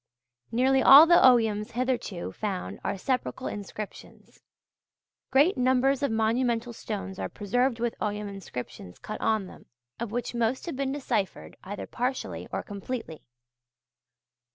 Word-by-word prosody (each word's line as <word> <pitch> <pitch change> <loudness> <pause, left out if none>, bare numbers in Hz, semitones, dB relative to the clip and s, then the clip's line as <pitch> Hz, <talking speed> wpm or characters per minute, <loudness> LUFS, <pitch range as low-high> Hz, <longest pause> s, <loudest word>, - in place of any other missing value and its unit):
Nearly 265 +3 +3
all 280 +5 +10
the 345 +1 +6
Oghams 225 -4 +4
hitherto 240 -7 -2
found 200 -4 -4
are - - -2
sepulchral 255 +4 -2
inscriptions. 205 0 -9 0.9
Great 285 +7 +4
numbers 260 +2 +3
of 280 - +1
monumental 230 +1 0
stones 195 -4 -6
are - - -3
preserved 235 +4 0
with 235 0 -1
Ogham 210 0 -2
inscriptions 125 - -8
cut 215 - -7
on 215 -3 +1
them, - - -14 0.3
of 235 -2 -4
which 245 +1 -3
most 235 +2 0
have 335 - -4
been 270 0 -1
deciphered, 240 -8 -3
either 200 +2 -6
partially 250 +2 -3
or - - -3
completely. 205 -4 -6
235 Hz, 130 wpm, -27 LUFS, 205-260 Hz, 0.9 s, all